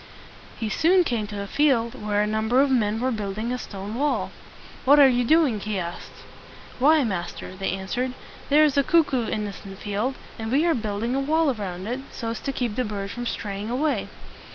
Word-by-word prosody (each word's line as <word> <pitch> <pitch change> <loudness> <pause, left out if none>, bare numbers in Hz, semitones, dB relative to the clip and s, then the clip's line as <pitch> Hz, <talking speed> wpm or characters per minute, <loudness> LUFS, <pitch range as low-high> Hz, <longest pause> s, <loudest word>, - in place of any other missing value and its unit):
He 225 - -2
soon 350 - +4
came 230 -9 -1
to 205 -1 -5
a - - -5
field 235 -1 +2
where 210 0 0
a - - +1
number 220 +4 +1
of 275 0 +4
men 220 -3 +2
were 255 +2 0
building 215 +1 -3
a 250 - -3
stone 200 -1 -7
wall. 285 +5 0 0.5
"What 285 +3 +6
are 280 - +9
you 245 -1 +2
doing?" 285 -4 +3
he 210 0 -3
asked. 175 -1 -7 0.5
"Why, 300 +3 +5
master," 185 -3 -4
they 195 0 -2
answered, 245 +7 -2 0.4
"there 295 +2 +6
is 295 -2 +2
a 280 - +5
cuck 325 -1 +3
oo 240 -4 +1
in 210 - -2
this 200 - -7 0.2
field, 210 +6 -2 0.2
and 220 0 -4
we 290 +5 +3
are 335 - +4
building 220 0 -2
a 270 - +1
wall 310 +2 +2
around 190 -4 -5
it 245 +4 -3
so 230 - -5
as 230 - -4
to 275 - -3
keep 240 -5 -3
the 255 - +2
bird 200 -3 -4
from 240 +2 -4
straying 205 -1 -4
away." 280 +5 0
230 Hz, 210 wpm, -24 LUFS, 210-270 Hz, 0.5 s, are